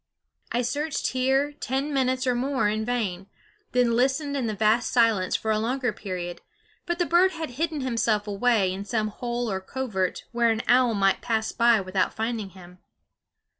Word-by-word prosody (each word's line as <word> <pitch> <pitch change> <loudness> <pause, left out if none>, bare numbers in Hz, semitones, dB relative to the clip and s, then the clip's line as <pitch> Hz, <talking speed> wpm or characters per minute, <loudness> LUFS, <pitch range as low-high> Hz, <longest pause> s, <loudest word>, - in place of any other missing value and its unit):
I 245 +1 0
searched 290 +5 -1
here 265 +3 +1
ten 275 +1 -3
minutes 260 -1 +1
or 250 - +2
more 260 -1 0
in 215 +1 -1
vain, 205 -6 -2 0.4
then 245 -2 +2
listened 275 +4 +1
in 260 -4 -1
the 215 - -2
vast 220 +3 +2
silence 225 -6 +3
for 220 - -1
a 215 - +1
longer 245 +1 -1
period; 180 -3 -6 0.5
but 345 0 -1
the 350 - +1
bird 365 +3 +4
had 320 -5 -5
hidden 310 +3 -2
himself 230 -4 0
away 205 -2 +2
in 195 +1 -5
some 215 0 -1
hole 240 +2 -3
or 190 0 -2
covert 190 -4 -3
where 235 -1 +2
an 225 0 0
owl 245 -2 +4
might 195 -1 +2
pass 220 -2 -1
by 235 -1 +4
without 185 0 -1
finding 220 -2 -2
him. 180 -1 -15
235 Hz, 175 wpm, -25 LUFS, 210-260 Hz, 0.5 s, bird